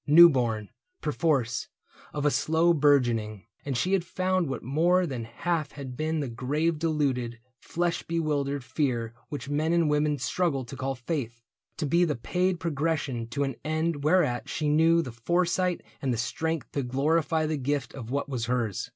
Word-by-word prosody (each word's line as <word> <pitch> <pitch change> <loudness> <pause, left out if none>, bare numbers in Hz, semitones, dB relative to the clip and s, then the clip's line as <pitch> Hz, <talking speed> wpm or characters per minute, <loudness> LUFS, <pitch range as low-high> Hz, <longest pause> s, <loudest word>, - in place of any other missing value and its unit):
New 170 +4 +10
born, 115 -7 -1 0.3
perforce, 145 -7 0 0.4
of 145 -1 -3
a 145 - +4
slow 160 +4 +3
bourgeoning. 120 - +2 0.2
And 135 -3 -2
she 185 +9 +1
had 190 -3 +3
found 185 -2 0
what 135 - -4
more 170 +8 +3
than 125 -7 -4
half 155 +6 -2
had 135 -3 -7
been 155 +2 -1
The 140 - -2
grave 150 +7 -1
deluded, 140 -7 0 0.2
flesh 175 0 -1
bewildered 145 -4 -1
fear 120 -3 -1 0.2
Which 145 -1 -5
men 155 +3 0
and 165 -3 +3
women 150 0 +2
struggle 140 -1 0
to 130 - -8
call 135 0 -2
faith, 120 -3 -4 0.3
To - - -1
be 170 +5 +3
the 155 -4 +1
paid 180 - 0
progression 150 -7 -1
to 130 +5 -1
an 135 -3 -3
end 155 -1 -1
Whereat 150 -6 +2
she 150 -2 -1
knew 165 +2 +4
the 130 - -6
foresight 175 +8 0 0.2
and 135 - 0
the 120 - 0
strength 160 +6 -2
To 140 - -1
glorify 155 +5 +1
the 155 0 -1
gift 140 -1 -2
of 120 -4 -8
what 140 +3 -1
was 125 -5 -2
hers. 120 -6 -1
145 Hz, 175 wpm, -27 LUFS, 125-165 Hz, 0.4 s, New